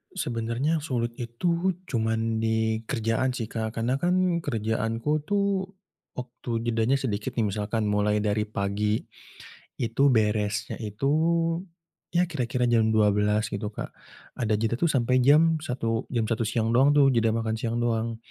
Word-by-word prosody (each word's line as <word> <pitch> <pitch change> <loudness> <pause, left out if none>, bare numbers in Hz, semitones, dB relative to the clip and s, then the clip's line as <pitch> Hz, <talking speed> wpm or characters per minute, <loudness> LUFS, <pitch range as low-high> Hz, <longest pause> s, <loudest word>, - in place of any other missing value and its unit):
Sebenarnya 120 +7 -1
sulit 120 -6 -2
itu 170 +10 -1
cuma 115 -8 -1
di 110 0 0
kerjaan 120 +1 0
sih 115 - -3
Kak, 110 -1 -3
karena 125 +4 0
kan 180 -1 +2
kerjaanku 115 -1 -2 0.2
tuh 200 -2 +1 0.5
waktu 125 -1 -8 0.2
jedanya 115 +3 +2
sedikit 120 -2 -3
nih 115 -3 +1
misalkan, 105 +2 -2
mulai 105 0 +1
dari 105 0 0
pagi 105 +1 -1 0.7
itu 120 +2 -2
beresnya 105 -3 +1
itu, 105 +4 -4 1.1
ya 175 - +5
kira 150 -9 -2
kira 125 +2 -1
jam 110 -1 +4
12.00 105 0 +2
gitu 105 +1 -3
Kak, 105 - -6 0.5
ada 110 -3 +1
jeda 115 +2 -1
tuh 170 - +3
sampai 125 +1 +3
jam 160 +2 +5
satu 120 -7 -2
jam 120 -3 -1
satu 115 0 +1
siang 115 0 0
doang 135 +4 +4
tuh 140 -2 +6
jeda 115 -2 +2
makan 110 -1 -1
siang 115 0 -2
doang, 115 -1 0
115 Hz, 150 wpm, -26 LUFS, 110-130 Hz, 1.1 s, tuh